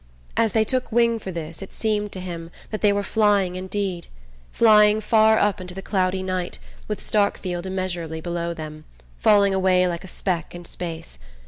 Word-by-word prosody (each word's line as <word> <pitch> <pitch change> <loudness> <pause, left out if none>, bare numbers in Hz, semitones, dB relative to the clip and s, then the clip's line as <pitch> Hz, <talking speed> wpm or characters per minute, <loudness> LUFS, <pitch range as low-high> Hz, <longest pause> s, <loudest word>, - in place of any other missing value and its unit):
As 225 -3 +2
they 220 - +4
took 255 +3 -2
wing 235 0 +3
for 190 - -6
this 165 0 -6
it 195 - -8
seemed 210 -2 -1
to 185 - -6
him 170 -2 -6 0.2
that 215 - -4
they 210 - +5
were 200 0 0
flying 200 -4 +2
indeed, 185 -1 -3 0.4
flying 210 -1 +5
far 220 0 +4
up 205 -2 +1
into 180 -1 -8
the 195 - -6
cloudy 185 -1 0
night, 185 -1 -3 0.3
with 210 - -3
Starkfield 190 -3 -1
immeasurably 175 -4 -3
below 170 0 -3
them, 155 -1 -8 0.3
falling 200 -2 +4
away 185 -1 +3
like 170 0 -3
a - - -9
speck 175 -2 -3
in 175 0 -9
space... 160 - -7
190 Hz, 180 wpm, -23 LUFS, 175-210 Hz, 0.4 s, they